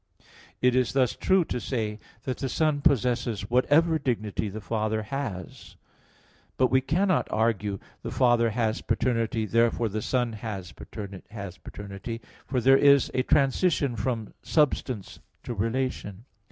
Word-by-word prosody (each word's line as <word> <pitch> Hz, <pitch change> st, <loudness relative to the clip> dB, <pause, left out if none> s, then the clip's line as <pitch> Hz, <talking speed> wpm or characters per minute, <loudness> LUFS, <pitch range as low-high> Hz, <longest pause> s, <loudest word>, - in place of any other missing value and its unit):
It 125 Hz, 0 st, +4 dB
is 130 Hz, -1 st, +2 dB
thus 130 Hz, -3 st, +2 dB
true 190 Hz, -2 st, +3 dB
to 125 Hz, -, -3 dB
say 110 Hz, -4 st, -3 dB, 0.2 s
that 130 Hz, -, -3 dB
the 135 Hz, -, -2 dB
Son 155 Hz, 0 st, +1 dB
possesses 120 Hz, -7 st, +1 dB
whatever 155 Hz, +6 st, +4 dB
dignity 110 Hz, -6 st, -2 dB
the 105 Hz, +3 st, -6 dB
Father 110 Hz, 0 st, -1 dB
has; 105 Hz, -7 st, -6 dB, 0.8 s
but 130 Hz, -, +3 dB
we 130 Hz, 0 st, +4 dB
cannot 180 Hz, +6 st, +1 dB
argue 105 Hz, -3 st, 0 dB, 0.2 s
"the -, -, -5 dB
Father 120 Hz, -2 st, +3 dB
has 110 Hz, 0 st, -1 dB
paternity, 115 Hz, -2 st, 0 dB
therefore 115 Hz, +1 st, +2 dB
the 110 Hz, +2 st, -3 dB
Son 120 Hz, 0 st, 0 dB
has 100 Hz, -5 st, -6 dB
paternity," 100 Hz, +1 st, -8 dB, 0.3 s
for 130 Hz, -, 0 dB
there 135 Hz, +2 st, +6 dB
is 140 Hz, -1 st, +5 dB
a 130 Hz, -, +2 dB
transition 140 Hz, 0 st, +2 dB
from 115 Hz, 0 st, -3 dB
substance 130 Hz, -, 0 dB, 0.2 s
to 120 Hz, -, -4 dB
relation. 115 Hz, -2 st, -2 dB
120 Hz, 135 wpm, -27 LUFS, 110-135 Hz, 0.8 s, there